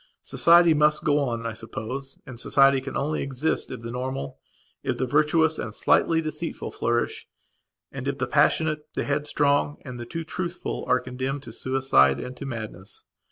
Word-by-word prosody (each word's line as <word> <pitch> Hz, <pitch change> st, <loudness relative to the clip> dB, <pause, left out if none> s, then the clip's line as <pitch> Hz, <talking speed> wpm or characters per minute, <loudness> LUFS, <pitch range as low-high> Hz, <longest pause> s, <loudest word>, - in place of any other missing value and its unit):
Society 170 Hz, 0 st, +5 dB
must 150 Hz, 0 st, +3 dB
go 145 Hz, -1 st, +3 dB
on, 120 Hz, -5 st, -2 dB
I 115 Hz, -, -2 dB
suppose, 130 Hz, +5 st, -6 dB
and 125 Hz, -3 st, -9 dB
society 135 Hz, +1 st, +4 dB
can 135 Hz, 0 st, -5 dB
only 150 Hz, +3 st, -1 dB
exist 140 Hz, +4 st, -1 dB
if -, -, -7 dB
the 115 Hz, 0 st, -6 dB
normal, 125 Hz, -, -4 dB, 0.4 s
if -, -, -2 dB
the 130 Hz, -, 0 dB
virtuous, 155 Hz, +3 st, +2 dB
and -, -, -3 dB
the -, -, -8 dB
slightly 165 Hz, +8 st, +3 dB
deceitful 155 Hz, +1 st, -5 dB
flourish, 120 Hz, 0 st, -1 dB, 0.6 s
and -, -, -6 dB
if -, -, -1 dB
the -, -, -1 dB
passionate, 155 Hz, -1 st, +1 dB
the -, -, 0 dB
headstrong, 145 Hz, 0 st, +1 dB
and 125 Hz, -2 st, -7 dB
the 120 Hz, -, -7 dB
too 165 Hz, +5 st, -4 dB
truthful 175 Hz, +2 st, -4 dB
are 125 Hz, -, +4 dB
condemned 130 Hz, +2 st, -4 dB
to 115 Hz, -, -9 dB
suicide 125 Hz, -, +3 dB
and 125 Hz, -, -6 dB
to 140 Hz, -, -6 dB
madness. 110 Hz, -5 st, -7 dB
135 Hz, 175 wpm, -25 LUFS, 120-150 Hz, 0.6 s, Society